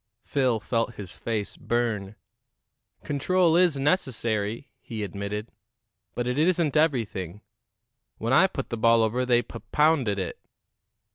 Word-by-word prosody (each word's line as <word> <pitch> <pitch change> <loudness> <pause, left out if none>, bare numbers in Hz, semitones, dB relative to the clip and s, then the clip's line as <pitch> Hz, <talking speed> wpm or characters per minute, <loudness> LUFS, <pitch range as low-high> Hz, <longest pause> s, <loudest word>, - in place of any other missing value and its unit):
Phil 130 -5 +1
felt 115 +1 -1
his 95 -4 -8
face 110 -3 -4
burn. 110 -4 -2 0.9
"Control 165 +4 +2
is 175 -4 +4
necessary," 120 - -1
he 110 -2 -5
admitted; 100 +2 -5 0.6
"but 120 - -1
it 125 +3 -1
isn't 165 -2 +2
everything. 110 - 0 0.8
When 115 +3 -1
I 185 +7 +6
put 135 -7 -5
the 115 - -3
ball 115 0 +4
over, 125 +3 0
they 120 -1 +4
pup 115 - -10
pounded 150 -9 +3
it." 95 -3 -4
120 Hz, 130 wpm, -26 LUFS, 105-145 Hz, 0.9 s, I